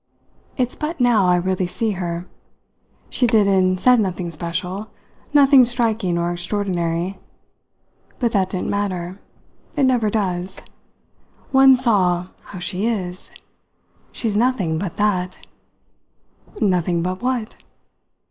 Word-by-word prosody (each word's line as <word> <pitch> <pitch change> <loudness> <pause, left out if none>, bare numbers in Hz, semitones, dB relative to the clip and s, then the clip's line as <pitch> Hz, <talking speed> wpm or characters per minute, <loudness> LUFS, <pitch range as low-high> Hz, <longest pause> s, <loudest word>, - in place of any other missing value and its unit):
"It's 250 -2 -1
but 310 +1 -4
now 235 -6 +4
I 180 - +4
really 185 +1 0
see 220 +4 -1
her. 175 -2 -4 0.9
She 250 - +2
did 220 -3 +3
and 185 -1 +2
said 250 +3 +5
nothing 185 -4 -2
special, 180 +6 -4 0.4
nothing 280 -2 +7
striking 225 -7 0
or 170 0 0
extraordinary; 175 -1 -2 1.0
but 235 -3 0
that 190 -4 +1
didn't 185 -1 -3
matter 185 -2 -3 0.6
it 290 - +1
never 245 -5 +3
does: 190 -3 -2 0.9
one 265 -1 +7
saw 185 -8 +1 0.2
how 200 - -10
she 180 +4 -2
is. 185 -6 -3 0.8
She's 220 -4 -2
nothing 205 -9 +1
but 180 -2 -4
that." 185 -3 0 1.2
"Nothing 180 -4 +1
but 185 +1 -3
what?" 245 -3 -2
195 Hz, 120 wpm, -21 LUFS, 180-230 Hz, 1.2 s, nothing